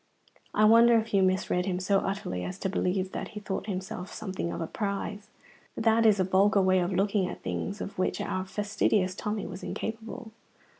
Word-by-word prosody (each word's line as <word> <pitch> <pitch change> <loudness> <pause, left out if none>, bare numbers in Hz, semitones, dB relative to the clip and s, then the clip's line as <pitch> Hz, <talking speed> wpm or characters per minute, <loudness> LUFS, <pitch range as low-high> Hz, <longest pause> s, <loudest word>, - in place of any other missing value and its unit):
I 215 - +5
wonder 230 +2 +7
if 225 0 -2
you 195 - +5
misread 185 -1 +1
him 180 -1 -1
so 195 +1 +2
utterly 195 - -3
as 185 - -5
to 190 - 0
believe 185 0 -1
that - - -4
he 215 - -8
thought 200 -1 -4
himself 190 -1 -5
something 190 -5 -4
of - - -4
a 165 - -2
prize? 205 +2 -4 0.5
That 225 0 +4
is 210 -2 +4
a - - +4
vulgar 195 +3 +3
way 185 0 +4
of 175 +1 0
looking 195 0 +1
at - - -8
things 200 +1 -3
of 195 - -6
which 185 - 0
our 185 0 -2
fastidious 205 -1 0
Tommy 210 +2 -3
was 185 +2 -7
incapable. 225 +1 -5
195 Hz, 195 wpm, -28 LUFS, 185-215 Hz, 0.5 s, wonder